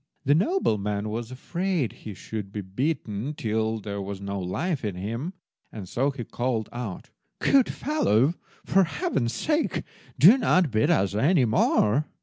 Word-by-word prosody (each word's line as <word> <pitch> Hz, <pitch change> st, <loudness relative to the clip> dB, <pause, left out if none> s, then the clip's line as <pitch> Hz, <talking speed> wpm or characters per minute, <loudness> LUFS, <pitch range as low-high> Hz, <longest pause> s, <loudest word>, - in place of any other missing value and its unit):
The 140 Hz, -, +5 dB
nobleman 105 Hz, -, 0 dB
was 115 Hz, +2 st, -4 dB
afraid 170 Hz, -, -2 dB
he 105 Hz, -3 st, -9 dB
should 105 Hz, -1 st, -6 dB
be 105 Hz, -, -4 dB
beaten 115 Hz, -, -3 dB
till 110 Hz, -2 st, -1 dB
there 100 Hz, -1 st, -5 dB
was 100 Hz, 0 st, -5 dB
no 100 Hz, 0 st, -4 dB
life 120 Hz, -, -2 dB
in 105 Hz, -4 st, -2 dB
him, 115 Hz, -, -4 dB, 0.4 s
and 100 Hz, -4 st, -8 dB
so 135 Hz, +9 st, 0 dB
he 135 Hz, -3 st, -5 dB
called 120 Hz, -2 st, -2 dB
out— 120 Hz, -6 st, -6 dB, 0.3 s
"Good 275 Hz, -3 st, +3 dB
fellow, 155 Hz, -, +2 dB, 0.3 s
for 190 Hz, 0 st, +4 dB
Heaven's 165 Hz, -, -1 dB
sake, 310 Hz, 0 st, 0 dB, 0.3 s
do 220 Hz, +11 st, +8 dB
not 185 Hz, -, +3 dB
beat 110 Hz, 0 st, +2 dB
us 95 Hz, 0 st, +2 dB
any 135 Hz, -, +3 dB
more!" 110 Hz, +4 st, +2 dB
115 Hz, 150 wpm, -26 LUFS, 105-160 Hz, 0.4 s, do